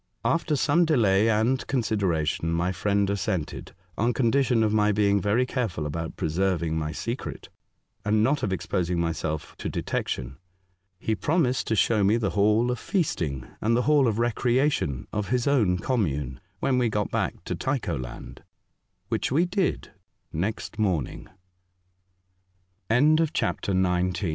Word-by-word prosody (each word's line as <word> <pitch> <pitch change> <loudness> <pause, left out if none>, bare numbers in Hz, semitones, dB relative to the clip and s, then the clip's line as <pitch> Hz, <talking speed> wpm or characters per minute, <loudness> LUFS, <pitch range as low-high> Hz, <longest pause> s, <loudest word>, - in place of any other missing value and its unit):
After 165 -2 +1
some 150 +5 +3
delay 115 - +3
and 115 +4 +2
consideration, 90 - 0
my 85 +2 0
friend 100 +2 +1
assented, 95 -7 -3 0.2
on 120 +3 +2
con 115 -1 +2
dition 130 -4 +3
of 105 -1 +1
my 105 -1 +3
being 100 -1 +2
very 105 +6 +2
careful 115 - -2
about 80 +2 -4
pre - - -2
serving 85 -1 0
my 75 -1 -2
secret, 115 - -5 0.5
and 105 +1 +2
not 140 +5 +2
of 105 - -1
exposing 90 -2 -1
myself 80 -2 -3
to - - -3
detection. 65 +1 -3 0.6
He 110 - -1
promised 150 0 +1
to 110 - +1
show 105 +1 +3
me 105 +4 +4
the 105 -4 -1
Hall 105 +4 +3
of 125 - -3
Feasting 80 - -1 0.2
and 115 +2 +2
the 125 - +1
Hall 145 -2 +4
of 110 -2 0
Recreation 120 - +1
of 105 -2 -2
his 125 -1 +1
own 110 -11 +3
commune, 75 - -1 0.2
when 130 -2 +2
we 120 -2 +2
got 105 -1 -1
back - - -2
to - - -3
Tycho 130 - -2
lan 65 -2 -8
105 Hz, 130 wpm, -26 LUFS, 85-125 Hz, 0.6 s, me